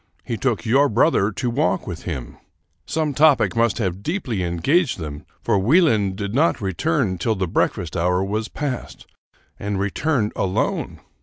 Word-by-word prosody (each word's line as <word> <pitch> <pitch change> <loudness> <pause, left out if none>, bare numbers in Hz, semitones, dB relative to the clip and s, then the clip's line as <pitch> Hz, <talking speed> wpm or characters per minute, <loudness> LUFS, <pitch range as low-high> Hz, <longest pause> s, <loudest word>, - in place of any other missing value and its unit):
He 115 - -3
took 115 -1 -1
your 135 +5 +4
brother 110 -11 +3
to 125 +4 -2
walk 125 -6 0
with 85 -3 -7
him. 65 -9 -5 0.5
Some 155 -2 -1
topic 150 -2 +4
must 115 -2 +2
have 95 -4 -2
deeply 140 - -2
engaged 120 - +1
them, 75 -4 -7 0.2
for 100 - +2
Wieland 110 - +3
did 100 0 -4
not 155 +7 +2
return 100 - -1
till 110 +5 0
the 95 -2 -1
breakfast 85 +1 -1
hour 90 +2 +1
was 105 +3 -2
passed, 140 -4 -5 0.5
and 100 -1 -2
returned 105 +3 0
alone. 95 -1 -1
105 Hz, 155 wpm, -22 LUFS, 95-140 Hz, 0.5 s, your